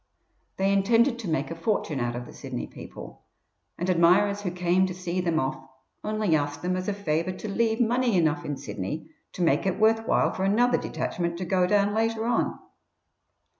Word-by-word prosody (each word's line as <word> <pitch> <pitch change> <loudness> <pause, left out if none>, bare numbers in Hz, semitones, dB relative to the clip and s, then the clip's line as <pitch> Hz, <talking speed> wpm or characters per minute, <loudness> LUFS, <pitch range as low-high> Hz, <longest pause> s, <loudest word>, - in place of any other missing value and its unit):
They 195 +1 +2
intended 230 +5 +3
to 220 - -5
make 155 -1 -1
a - - -4
fortune 165 -5 -1
out 120 -1 -1
of 120 0 -5
the - - -12
Sydney - - -5
people, - - -11 0.6
and 175 - -2
admirers 185 +4 +4
who 195 - -2
came 180 +1 +2
to 185 - -5
see 180 0 -2
them 170 -3 +1
off 130 -1 -2 0.4
only 215 -5 +1
asked 145 +1 -2
them 180 +1 0
as 185 0 -3
a 205 - 0
favour 170 -2 -1
to 200 - -7
leave 225 +2 0
money 240 -2 +2
enough 165 0 +1
in 145 -3 -4
Sydney 130 - -5 0.2
to 180 - -2
make 170 - +2
it 190 0 0
worth 225 +1 +3
while - - +3
for 190 - -3
another 240 +6 +3
detachment 170 -1 -3
to 185 - -4
go 185 -1 +2
down 205 +1 +2
later 225 0 0
on. 235 -1 0
185 Hz, 195 wpm, -26 LUFS, 165-215 Hz, 0.6 s, admirers